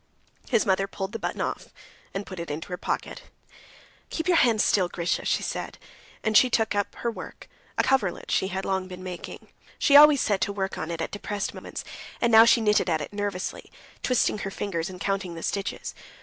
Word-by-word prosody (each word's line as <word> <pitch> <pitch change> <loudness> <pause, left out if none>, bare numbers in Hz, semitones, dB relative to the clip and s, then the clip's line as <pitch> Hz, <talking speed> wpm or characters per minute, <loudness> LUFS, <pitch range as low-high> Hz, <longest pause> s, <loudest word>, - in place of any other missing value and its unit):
His 230 -4 +3
mother 195 -1 +2
pulled 195 0 -5
the 225 - -5
button - - -3
off - - -3 0.4
and 195 +1 -4
put 185 -2 -8
it 170 - -5
in 150 +1 -3
her 180 - -5
pocket. - - -3 0.9
"Keep 320 - -3
your 345 - +5
hands 230 -6 +4
still, 185 -3 +3
Grisha," 170 0 -1
she - - +1
said, - - -4 0.5
and 215 -1 0
she 255 +5 +7
took 225 -3 +1
up 205 -1 -1
her 235 - -2
work, - - -10 0.3
a - - +3
coverlet 260 -9 0
she 190 - +2
had 190 0 -3
long 190 -1 -1
been 185 0 -9
making. 180 -2 -8 0.3
She 285 - +4
always 295 -1 +9
set 205 -5 +1
to - - +1
work 195 -1 -3
on 160 - -4
it 165 -1 -3
at - - -3
depressed 205 0 -3
moments, - - -7 0.4
and 235 - +2
now 225 0 +9
she 235 0 +5
knitted 210 -4 +3
at 160 -2 +1
it 150 - -7
nervously, 205 -2 -4 0.3
twitching 250 -4 +1
her 195 - -3
fingers 185 -4 -3
and 185 -1 -9
counting 195 -3 -2
the 165 - -7
stitches. 200 -1 -3
200 Hz, 205 wpm, -26 LUFS, 185-220 Hz, 0.9 s, always